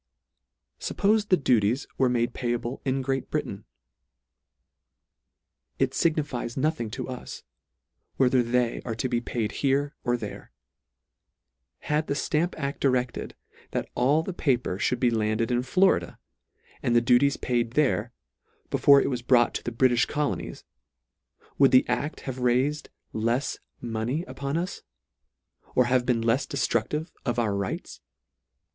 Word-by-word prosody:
Suppofe 210 +1 +1
the 185 - +5
duties 120 -3 +2
were 130 -1 +4
made 120 -1 0
payable 120 0 -3
in 135 0 -1
Great 135 0 -2
Britain? - - -3 2.1
It - - +1
lignifies 145 -7 -1
nothing 140 -5 0
to 130 +3 -5
us, 130 -1 -7 0.7
whether 130 -1 +4
they 120 0 0
are 115 -3 -4
to 115 - -1
be 120 -2 0
paid 115 -3 -2
here 140 +4 0
or 120 -1 +1
there. - - -8 1.3
Had 150 +1 -1
the 140 - -1
Stamp 165 +5 0
aB 140 -2 -3
directed, 125 -2 0 0.4
that - - -2
all 140 +6 +2
the 190 - -5
paper 125 - 0
ihould 125 - 0
be 120 -1 +3
landed 110 +1 0
in 120 0 +2
Florida, 185 +9 +2 0.6
and 120 - +1
the - - +7
duties 125 +4 +3
paid 120 -2 -1
there, 125 -5 +1 0.6
before 140 -1 +6
it - - +1
was 125 -2 -2
brought 120 -1 +4
to - - -4
the 120 - -3
Britijh 120 0 +3
Colonies, 150 -1 -3 1.0
would 135 -1 +7
the 130 - +5
acl 145 +3 -2
have 130 -1 -5
raifed 130 +4 +1 0.3
lefs 115 +5 -1 0.2
mo 115 -2 -3
ney 135 +9 -1
upon 140 -1 -3
us, 175 +2 -3 0.9
or 125 - +5
have 125 0 +1
been 120 -2 +1
lefs 125 +4 +1
deftruclive 140 +2 -1
of 120 -2 -1
our 110 -4 +1
rights? 100 -1 -4
125 Hz, 140 wpm, -26 LUFS, 120-140 Hz, 2.1 s, the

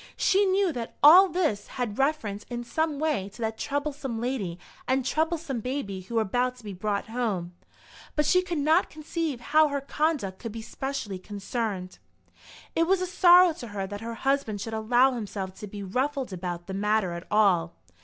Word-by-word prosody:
She 400 +1 +3
knew 380 -2 +2
that 235 -3 -6
all 360 +6 +9
this 315 - 0
had 240 -3 -3
reference 250 -8 0
in 240 -1 -4
some 315 +4 -1
way 290 -10 -1
to - - -11
that 220 0 -3
troublesome 285 -4 -3
lady 225 -8 -2 0.3
and 260 0 +1
troublesome 315 -3 -1
baby 225 -6 -4
who 210 +6 -8
were 225 - +3
about 250 +5 0
to 250 - -16
be 205 -2 -6
brought 200 +3 -2
home; 210 -8 -2 0.6
but 300 - +2
she 365 +5 +4
could 350 -2 -4
not 315 +5 +3
conceive 310 -3 -3
how 310 0 +7
her 285 -1 -2
conduct 275 -8 -1
could 230 -3 -6
be 225 - -6
specially 265 -7 -4
concerned. 200 -1 -4 0.8
It 330 0 +2
was 385 +1 +3
a 365 - -1
sorrow 355 -1 +6
to 245 - -9
her 205 -2 -4
that 205 +2 -7
her 230 0 -5
husband 270 -5 0
should 225 +3 -5
allow 240 +4 +3
himself 200 -5 -5
to 210 - -6
be 205 0 -7
ruffled 260 +4 -2
about 175 -1 -5
the 190 - -6
matter 210 -1 +1
at 170 +1 -7
all. 185 -6 +3
240 Hz, 185 wpm, -27 LUFS, 205-300 Hz, 0.8 s, all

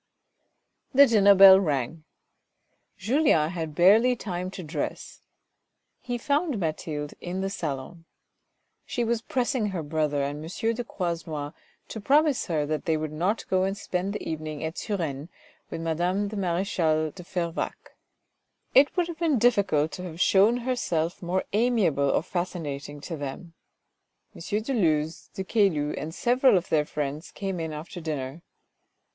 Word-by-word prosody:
The 280 +1 +9
dinner 205 -5 +5
bell 190 0 +10
rang, 150 -2 -2 0.9
Julien 205 - +2
had 160 -4 -5
barely 220 +9 +5
time 185 -5 -4
to 185 -1 -8
dress: 155 +1 -5 0.8
he 245 -1 -4
found 290 +2 0
Mathilde 155 -3 -3
in 185 +2 -4
the 195 0 -2
salon. 160 0 -5 0.8
She 240 - -2
was 230 0 0
pressing 245 -2 -1
her 185 -5 -3
brother 150 -1 0
and 145 +2 -4
M. 225 +8 -2
de 245 +2 -4
Croisenois 165 -8 -4 0.4
to 220 - -6
promise 290 +4 +3
her 155 -5 0
that 155 +1 -3
they 160 -2 +1
would 155 -1 -4
not 180 +8 -1
go 185 0 +2
and 195 +1 -1
spend 185 +2 -3
the - - -5
evening 155 -1 -4
at 160 +1 -3
Suresnes 160 -7 -3 0.4
with 165 - -5
madame 175 +5 0
the 215 - -7
marechale 170 -4 0
de 180 - -11
Fervaques. 175 -2 -4 0.8
It 285 +6 +5
would 350 -1 +2
have 340 -1 -7
been 320 -6 +2
difficult 200 -10 +2
to 180 - -7
have 165 -2 -8
shown 205 +6 +4
herself 205 -10 -2
more 180 +1 -1
amiable 205 - +2
or - - +1
fascinating 150 -6 -4
to 165 - -5
them. 145 +4 -7 0.8
M. - - -12 0.2
de 270 - -2
Luz, 160 -7 0
de 190 - -3
Caylus 190 -8 +1
and 160 +3 -6
several 250 -2 +4
of 180 - -3
their 150 -2 +2
friends 150 +1 -4
came 195 -3 -4
in 160 -1 -3
after 160 +4 -7
dinner. 150 -1 -4
175 Hz, 150 wpm, -26 LUFS, 155-210 Hz, 0.9 s, bell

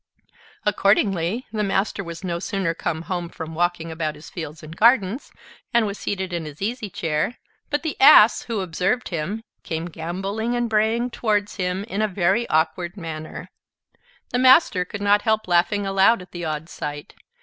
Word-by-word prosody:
Accordingly, 200 +1 +2
the 215 -1 -2
Master 200 0 0
was 170 +1 -8
no 170 -2 -2
sooner 190 -3 -1
come 160 -1 -3
home 175 -1 -3
from 160 0 -7
walking 170 0 -1
about 155 -1 -3
his 150 - -13
fields 160 -2 -7
and 155 +1 -9
gardens, 225 +2 +3 0.4
and 235 -2 +5
was 200 0 -4
seated 190 -2 -3
in 170 -2 -3
his 150 -1 -9
easy 220 +1 -3
chair, 160 +6 -2 0.3
but 290 +1 -1
the 315 - -2
Ass, 265 -6 +8
who 225 -4 -2
observed 185 +7 -1
him, 185 +7 -3 0.2
came 160 0 -4
gamboling 195 +8 -3
and 240 0 0
braying 225 +3 +1
towards 210 -4 -1
him, 185 0 -1
in 205 -1 -3
a 215 - +2
very 195 +4 +1
awkward 170 +4 0
manner. 160 -3 -7 0.8
The 245 - +1
Master 255 - +5
could 205 +2 -7
not 205 0 +4
help 220 -2 +1
laughing 180 +3 +2
aloud 195 +1 +3
at 180 - -18
the 175 -1 -5
odd 155 0 -3
sight. 145 -3 -6
190 Hz, 170 wpm, -23 LUFS, 170-215 Hz, 0.8 s, Ass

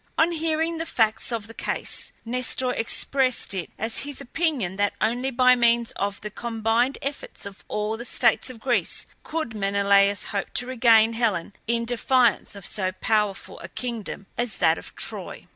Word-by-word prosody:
On 325 +2 +4
hearing 325 0 -1
the 330 - -3
facts 225 -4 +1
of 225 -3 -2
the 225 - -11
case - - -2
Nestor 250 +1 0
expressed 255 0 +2
it 185 -3 -4
as 225 +2 -1
his 285 -1 -4
opinion 275 - -1
that 205 0 +1
only 245 +4 0
by 255 0 +5
means 235 -1 +3
of 200 0 -3
the 210 - -6
combined 230 +3 0
efforts 275 -5 -5
of 200 -1 -10
all 210 +1 -2
the 235 - -6
states - - +2
of 250 -3 -10
Greece 245 +1 0 0.2
could 315 -7 -4
Menelaus 200 0 +3
hope 200 - -3
to 245 - +2
regain 230 -3 +4
Helen 215 -6 0
in 235 0 +1
defiance 245 -2 +2
of 200 -3 -9
so 185 -3 0
powerful 210 0 -1
a - - -9
kingdom 230 -5 -5
as 240 -4 -1
that 165 -2 +3
of - - -11
Troy. - - -4
230 Hz, 170 wpm, -25 LUFS, 205-255 Hz, 0.2 s, by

